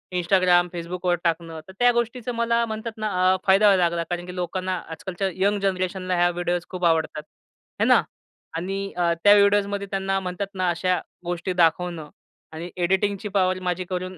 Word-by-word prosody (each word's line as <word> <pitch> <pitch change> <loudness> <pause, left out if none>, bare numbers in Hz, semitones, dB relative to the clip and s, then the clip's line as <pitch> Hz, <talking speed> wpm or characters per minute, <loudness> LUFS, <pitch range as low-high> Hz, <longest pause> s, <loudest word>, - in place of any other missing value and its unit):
Instagram, 180 0 +3
Facebookवर 175 +1 -2
टाकणं. 165 -1 -2
तर 190 - -12
त्या 245 0 +5
गोष्टीचं 240 +1 -2
मला 235 0 +1
म्हणतात 220 +1 -5
ना, 215 0 -2 0.3
अ, - - +2
फायदा 195 +2 +5
व्हायला 190 -3 +5
लागला 170 0 0
कारण 175 0 -3
की 180 0 -8
लोकांना, 185 +1 -2
आजकालच्या 190 +3 -4 0.2
यंग 205 0 +2
जनरेशनला 185 -1 -1
ह्या 175 0 +3
व्हिडिओस 175 0 -2
खूप 180 -1 -3
आवडतात, 160 -2 +1 0.6
आहे - - +3
ना - - +6 0.6
आणि 190 +4 -3 0.2
अ, 175 -1 +2
त्या 205 - +8
व्हिडिओजमध्ये 200 0 +2
त्यांना 195 0 0
म्हणतात 185 +1 -4
ना, 185 -2 0
अशा 180 +1 0 0.3
गोष्टी 175 +2 -2
दाखवणं 165 -1 +1 0.4
आणि 165 +2 -7
एडिटिंगची 190 +3 0
पॉवर 185 -2 +1
माझी 180 +1 -1
करून 185 0 -4
185 Hz, 170 wpm, -24 LUFS, 175-200 Hz, 0.6 s, त्या